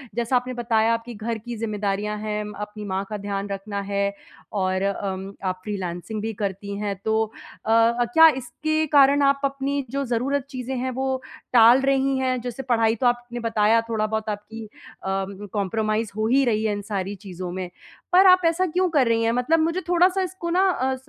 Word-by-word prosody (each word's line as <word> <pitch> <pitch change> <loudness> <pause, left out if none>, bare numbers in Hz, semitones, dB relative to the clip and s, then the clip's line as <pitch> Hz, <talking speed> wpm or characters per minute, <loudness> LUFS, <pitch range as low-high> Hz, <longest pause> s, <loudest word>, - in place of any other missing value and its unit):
जैसा 235 +2 0
आपने 250 +1 0
बताया 230 -2 +2
आपकी 230 +1 -4
घर 225 +2 -3
की 240 +2 -7
ज़िम्मेदारियाँ 210 -1 -2
हैं, 210 0 -3 0.2
अपनी 210 0 -6
माँ 190 0 -2
का 210 - -3
ध्यान 200 0 -4
रखना 200 +1 -4
है 200 0 -1 0.4
और 185 -2 0
अम, 195 -1 -3
आप 185 -1 -2
फ्रीलांसिंग 190 0 -4
भी 225 +1 -3
करती 200 0 -4
हैं, 205 -1 -2
तो 220 0 +2 0.4
अ, 230 +2 +3
क्या 325 0 +9
इसके 310 +5 -1
कारण 280 0 +6
आप 275 0 +3
अपनी 275 0 -2
जो 275 0 -1
ज़रूरत 255 +3 -1
चीज़ें 260 -1 -5
हैं 255 +1 -2
वो 265 +1 -2 0.3
टाल 240 +2 +7
रही 270 0 +2
हैं? 255 -1 0
जैसे 245 +2 -5
पढ़ाई 230 -3 +2
तो 245 +2 +1
आपने 240 0 -1
बताया 225 -1 +3
थोड़ा-बहुत 220 -1 -1
आपकी 220 +2 -6
अ, - - -15 0.9
कंप्रोमाइज़ 215 +2 -1
हो 215 - +1
ही 270 +4 +4
रही 220 -3 +1
है 210 - +1
इन 205 - -4
सारी 195 +1 -2
चीज़ों 180 -1 -6
में। 185 0 -5 0.4
पर 375 +2 +7
आप 365 0 +7
ऐसा 335 +3 +2
क्यों 365 +2 +1
कर 285 -7 +3
रही 230 0 +2
हैं? 230 - +2
मतलब 250 +7 +2
मुझे 330 +4 0
थोड़ा-सा 360 +2 +3
इसको 355 -1 -5
ना 375 +3 +3
अ, 265 -6 0
230 Hz, 190 wpm, -24 LUFS, 210-265 Hz, 0.9 s, क्या